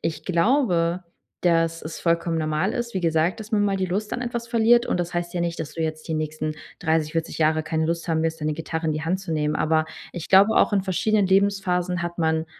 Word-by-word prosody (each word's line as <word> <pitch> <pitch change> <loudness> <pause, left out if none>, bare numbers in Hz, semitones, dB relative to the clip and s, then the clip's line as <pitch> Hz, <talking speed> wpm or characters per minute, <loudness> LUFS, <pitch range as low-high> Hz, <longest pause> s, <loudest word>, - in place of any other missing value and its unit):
ich 155 -1 -3
glaube, 180 -3 +1 0.4
dass 165 -1 +2
es 155 +1 -7
vollkommen 170 -1 +1
normal 155 +5 0
ist, 240 -3 -4
wie 190 - 0
gesagt, 165 +3 +1
dass 215 +1 -10
man 205 -1 +3
mal 200 -1 +1
die 190 - 0
Lust 205 +4 -3
an 250 - -3
etwas 235 -1 -4
verliert. 235 +1 +4
Und - - 0
das 175 0 -2
heißt 175 0 -3
ja 175 - -1
nicht, 170 -1 -2
dass 155 - -6
du 165 - -2
jetzt 155 -1 -4
die 160 - -1
nächsten 155 0 -3 0.2
30, 160 -2 0
40 165 -1 -2
Jahre 155 0 +2
keine 160 0 -1
Lust 170 +1 -2
haben 160 -1 +1
wirst, 160 0 -2
deine 150 0 -1
Gitarre 160 +1 -4
in 155 - +1
die 155 - -3
Hand 180 +4 -1
zu 190 -4 -5
nehmen. 150 -1 0
Aber 155 0 +2 0.3
ich 175 -2 -6
glaube 200 +3 +6
auch, - - +4
in 195 - +2
verschiedenen 200 +2 +1
Lebensphasen 190 -2 +1
hat 175 0 -4
man 160 0 +1
170 Hz, 240 wpm, -24 LUFS, 160-195 Hz, 0.4 s, glaube